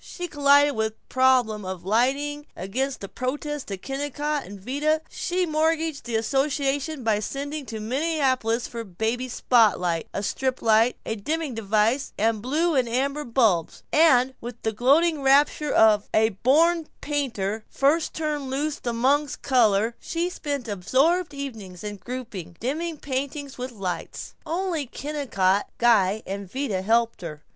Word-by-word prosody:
She 355 -1 -6
collided 285 -1 +4
with 220 0 -1
the - - -42
problem 255 -5 +3
of 185 -2 -6
lighting. 275 +7 0
Against 255 +8 -3
the 200 - -5
protest 290 +4 -4
of 195 -2 -6
Kennicott 290 +2 -2
and 200 +1 -10
Vida 295 +9 0
she 365 0 -1
mortgaged 320 -2 0
the 235 -2 -3
association 275 +4 0
by 220 -2 +2
sending 280 +5 -5
to 220 -1 -5
Minneapolis 260 -2 0
for 235 - -7
a - - -3
baby 225 +7 -2
spotlight, 200 -9 +2
a 200 - -3
strip 260 +4 -2
light, 225 +2 +4
a 220 - -2
dimming 300 +6 -3
device, 225 +4 +1
and 220 0 +1
blue 315 +8 +1
and 255 -4 +1
amber 275 +5 -1
bulbs; 225 - +1
and 265 -5 +5
with 240 0 -7
the 220 - +1
gloating 285 +8 +3
rapture 285 +2 +3
of 215 -2 +4
a 220 0 +4
born 305 - +2
painter 225 -8 -2
first 300 +4 +1
turned 300 -3 -2
loose 290 +3 -2
among 260 +5 +2 0.2
colors, 225 -4 +3
she 345 +1 -2
spent 285 -7 -4
absorbed 275 - +1
evenings 225 -11 -7
in 205 -1 -5
grouping, 210 -8 -7
dimming 315 +7 -2
painting 280 +1 -4
with 250 +1 -5
lights. 190 -6 -5
Only 335 -4 -2
Kennicott, 230 -10 -1
Guy, 220 -3 +3
and 195 -1 -6
Vida 255 -9 -2
helped 230 +2 +1
her. 150 -4 -7
255 Hz, 150 wpm, -25 LUFS, 220-290 Hz, 0.2 s, and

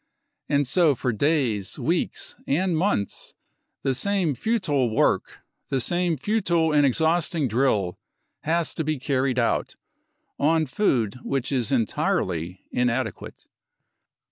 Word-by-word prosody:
And 140 -1 +2
so 160 0 +3
for 125 0 -1
days, 120 - 0
weeks - - -1
and 175 +5 +1
months 160 - -1 0.5
the 135 - +1
same 185 +2 0
futile 145 - 0
work, 110 - 0 0.3
the 135 - 0
same 175 +4 0
futile 170 - +1
and 145 -1 +5
exhausting 160 +1 +1
drill 110 -6 +1 0.4
has 165 +1 0
to 160 - -2
be 155 0 -1
carried 130 -2 0
out, 120 -2 0 0.6
on 160 +2 +3
food 125 - 0
which 135 -1 -2
is 130 -1 0
entirely 90 - -1
inadequate. 125 -3 -2
140 Hz, 115 wpm, -24 LUFS, 125-165 Hz, 0.6 s, and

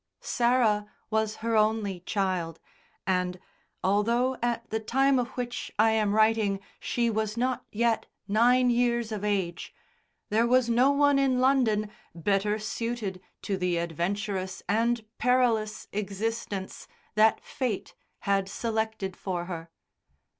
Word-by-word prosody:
Sarah 235 -4 +2 0.2
was 220 0 +1
her 230 -1 +1
only 215 -3 +1
child, 180 -3 -2 0.5
and, 180 -1 0 0.4
although 235 +7 +2
at 235 -1 -1
the 220 - 0
time 265 +4 +2
of 245 - 0
which 245 -1 -4
I 220 +1 +5
am 210 -2 +1
writing 215 -2 +3 0.2
she 235 -1 0
was 215 0 -2
not 255 +1 -1
yet 230 +1 +1 0.2
nine 245 +4 +4
years 235 -1 +1
of 210 -2 -4
age, 190 -5 -2 0.5
there 225 +3 +3
was 255 0 +4
no 250 +4 +5
one 285 0 +4
in 265 -2 +2
London 235 -6 +2 0.2
better 200 +5 +1
suited 215 -3 -4 0.2
to 195 - -1
the 180 -2 0
adventurous 185 +3 -2
and 230 +3 +1
perilous 235 -4 +1
existence 205 0 -4 0.3
that 215 +1 +4
Fate 245 -7 -3 0.3
had 195 -1 +1
selected 220 -4 -2
for 180 -3 -3
her. 170 -2 -6
220 Hz, 125 wpm, -28 LUFS, 195-235 Hz, 0.5 s, I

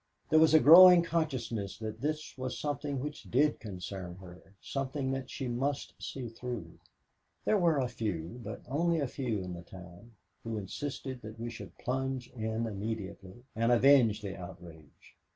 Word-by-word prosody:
There 155 - +7
was 160 0 +6
a - - +9
growing 175 +3 +10
consciousness 130 - -2
that 110 0 -6
this 155 +2 -3
was 130 -1 -4
something 145 -1 -2
which 150 +1 -5
did 145 +4 +3
concern 95 -3 -6
her, 95 +1 -14
something 135 0 -3
that 135 -1 -4
she 135 - -4
must 135 +4 -2
see 130 -3 -5
through. 120 0 -7 0.7
There 215 - +3
were 170 -4 +3
a 130 -2 +1
few, 110 -3 -4
but 105 +1 -6
only 165 +5 +1
a 145 - +1
few 120 -7 -3
in 90 -1 -5
the 85 - -7
town, 90 +5 -13 0.3
who 115 -1 -3
insisted 130 +5 -5
that 110 +1 -9
we 120 0 -4
should 115 - -10
plunge 130 0 -3
in 110 -1 -2
immediately 105 0 -6
and 115 +2 +2
avenge 120 -4 +5
the 100 -2 -4
outrage. 85 -4 -12
120 Hz, 165 wpm, -31 LUFS, 105-140 Hz, 0.7 s, growing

